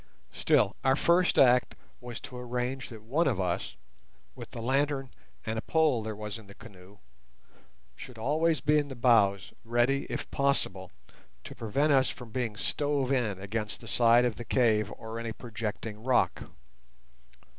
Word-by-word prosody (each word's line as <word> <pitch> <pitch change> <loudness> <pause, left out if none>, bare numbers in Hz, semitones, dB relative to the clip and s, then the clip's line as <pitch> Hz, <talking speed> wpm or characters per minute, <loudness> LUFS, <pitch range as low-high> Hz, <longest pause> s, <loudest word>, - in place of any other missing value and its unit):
Still, - - +2
our 135 0 +4
first 175 +4 +3
act 125 -1 +5 0.2
was 120 -1 -7
to 125 - -10
arrange 125 +1 -3
that 110 -2 -11
one 145 +9 +1
of 115 -8 0
us, 90 0 -2 0.6
with - - -10
the - - -8
lantern 135 +2 0 0.3
and 110 0 -2
a - - -4
pole 155 -6 +2
there 110 0 -5
was 105 +1 -6
in 110 - -15
the 100 - -13
canoe, 100 -3 -15 1.0
should 125 - -11
always 155 +7 +1
be 150 +1 +3
in 145 - -2
the 135 - -7
bows 105 -6 +3
ready, 120 +4 +1
if - - -4
possible, 100 -10 0 0.5
to - - -9
prevent 140 +7 +1
us 130 -1 +4
from 120 -3 -9
being 115 -3 -3
stove 145 +1 -1
in 115 -8 0
against 105 +2 -4
the 115 - -12
side 120 +1 +4
of 120 -3 -1
the 120 - -6
cave 110 -4 +2
or 110 0 -7
any 115 -1 -4
projecting 110 -2 -6
rock. 130 0 +1
120 Hz, 165 wpm, -29 LUFS, 110-135 Hz, 1.0 s, act